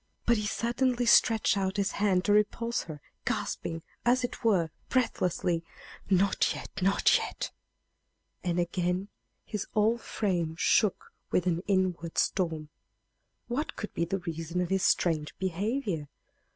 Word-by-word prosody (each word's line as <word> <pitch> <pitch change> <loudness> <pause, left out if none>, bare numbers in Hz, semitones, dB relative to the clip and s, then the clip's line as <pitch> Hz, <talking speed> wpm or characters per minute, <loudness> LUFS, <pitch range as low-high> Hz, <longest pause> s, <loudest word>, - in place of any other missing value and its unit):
But 235 -1 +4
he 210 0 -1
suddenly 245 +2 0
stretched 225 -2 +5
out 190 -1 -1
his 200 -1 +1
hand 190 -3 +1
to 205 - +4
repulse 230 +3 +1
her, 155 -3 -8 0.2
gasping, 165 -1 -3 0.2
as 250 +1 +3
it 245 - -4
were, 185 -8 +3 0.2
breathlessly, 180 -8 0 0.5
"Not 195 0 +3
yet - - -8
not 195 +2 +4
yet!" - - -4 0.9
and 175 -1 0
again 180 +2 -1 0.4
his 210 -2 -4
whole 220 +2 +3
frame 175 -8 -1
shook 210 +3 +2 0.2
with 180 - +1
an 175 -1 +1
inward 185 -4 0
storm. 160 -5 0 0.8
What 270 +6 -2
could 210 - -6
be 170 - 0
the 190 +3 -1
reason 165 -1 -4
of 180 -1 0
his 190 -1 +2
strange 160 -5 +1
behavior? 190 - -2
190 Hz, 140 wpm, -29 LUFS, 170-215 Hz, 0.9 s, stretched